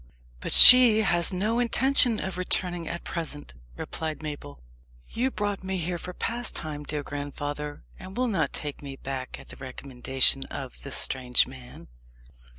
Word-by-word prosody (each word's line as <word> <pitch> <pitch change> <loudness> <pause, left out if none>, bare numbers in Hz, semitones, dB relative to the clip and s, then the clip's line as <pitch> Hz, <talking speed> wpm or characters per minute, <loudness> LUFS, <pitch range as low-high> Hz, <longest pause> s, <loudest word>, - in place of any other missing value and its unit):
"But - - -5
she 245 -4 +10
has 175 -3 +2
no 210 +6 -2
intention 245 -1 +3
of 190 -1 -6
returning 175 -2 0
at 170 - -7
present," 150 - -5 0.2
replied 155 -1 -6
Mabel. 145 - -9 0.5
"You 250 +3 -2
brought 205 -5 -5
me 190 0 -4
here 175 0 -4
for 180 - -8
pastime, 175 -9 -5
dear 150 0 -5
grandfather, 145 +1 -7 0.2
and 190 +3 -12
will 255 - 0
not 195 -9 -2
take 145 -2 -6
me 140 -1 -9
back 135 -1 -7
at - - -16
the - - -12
recommendation 130 0 -1
of 130 -3 -9
this 140 - -2
strange 125 -2 0
man?" 130 -1 -14
160 Hz, 155 wpm, -25 LUFS, 140-195 Hz, 0.5 s, she